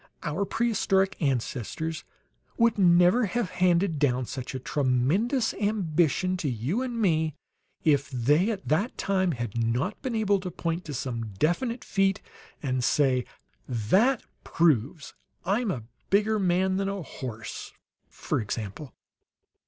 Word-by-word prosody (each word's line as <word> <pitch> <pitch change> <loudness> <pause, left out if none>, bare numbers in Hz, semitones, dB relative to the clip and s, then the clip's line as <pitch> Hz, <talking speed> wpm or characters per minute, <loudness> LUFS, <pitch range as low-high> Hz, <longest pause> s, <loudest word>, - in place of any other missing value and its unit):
"Our 165 +7 -1
prehistoric 195 -4 +1
ancestors 140 +3 -2 0.5
would 230 -2 +3
never 180 +5 +5
have 230 -2 -2
handed 180 -2 +2
down 130 -3 +2
such 130 +2 -6
a - - -2
tremendous 150 - +1
ambition 185 -3 +1
to 160 -5 -2
you 130 - -1
and 245 -3 -3
me 160 -7 +1 0.5
if 145 -3 +2
they, 145 - +2
at 205 -4 -4
that 190 +11 0
time, 190 -3 +1
had 120 -4 -5
not 120 - -1
been 255 -4 -3
able 205 -2 +2
to 185 -1 -5
point 170 +1 -3
to 145 - -5
some 115 -4 -4
definite 230 - 0
feat 195 0 +1 0.4
and 130 -2 0
say, 130 -2 +2 0.4
'That 185 - +2 0.2
proves 150 -2 +1 0.3
I'm 210 +5 +1
a 125 - -3 0.3
bigger 210 +2 +3
man 185 0 +2
than 195 0 0
a 195 -2 -4
horse,' 115 -6 -7 0.4
for - - -2
example." 110 +5 -5
170 Hz, 135 wpm, -27 LUFS, 130-200 Hz, 0.5 s, never